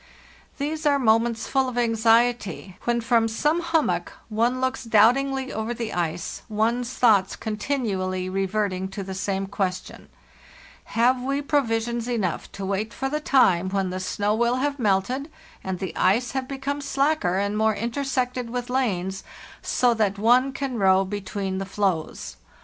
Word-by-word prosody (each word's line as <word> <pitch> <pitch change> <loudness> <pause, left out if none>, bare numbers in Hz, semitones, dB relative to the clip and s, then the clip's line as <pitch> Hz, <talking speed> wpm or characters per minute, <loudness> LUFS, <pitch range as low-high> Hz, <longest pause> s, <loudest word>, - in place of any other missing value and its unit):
"These 305 +2 -2
are 285 -1 +4
moments 230 -2 +2
full 265 -1 +1
of 245 - -7
anxiety, 225 -4 +2
when 235 0 +1
from 230 0 +3
some 300 +9 +1
hummock 325 -1 0 0.2
one 235 +4 +1
looks 260 0 -1
doubtingly 260 +4 +3
over 220 +2 -3
the 230 -2 -4
ice, 170 -1 -3
one's 230 +3 0
thoughts 205 -7 +3
continually 210 -5 -2
reverting 195 0 -1
to 195 +1 -6
the 190 0 -6
same 195 +1 -2
question: 190 -2 -4 0.8
have 250 +2 +2
we 275 +2 -1
provisions 235 -5 0
enough 215 -9 -2
to 195 - -5
wait 200 +3 -2
for 270 - -2
the 300 +2 -1
time 190 -11 +3
when 190 -1 -1
the 185 - -3
snow 205 +3 -1
will 235 +2 +2
have 280 +2 -1
melted 235 +7 0 0.3
and 190 -1 -3
the 190 0 -5
ice 235 +6 +2
have 265 -1 -3
become 275 +1 -3
slacker 275 - +1
and 200 +1 0
more 220 0 +2
intersected 250 +1 -2
with 245 +1 -4
lanes, 195 -7 -1 0.4
so 245 -1 +2
that 210 -3 0
one 245 +5 +4
can 265 -3 -3
row 190 0 +4
be 205 +2 -4
tween 190 -1 -3
the - - -2
floes? 190 -4 -2
225 Hz, 155 wpm, -24 LUFS, 195-255 Hz, 0.8 s, are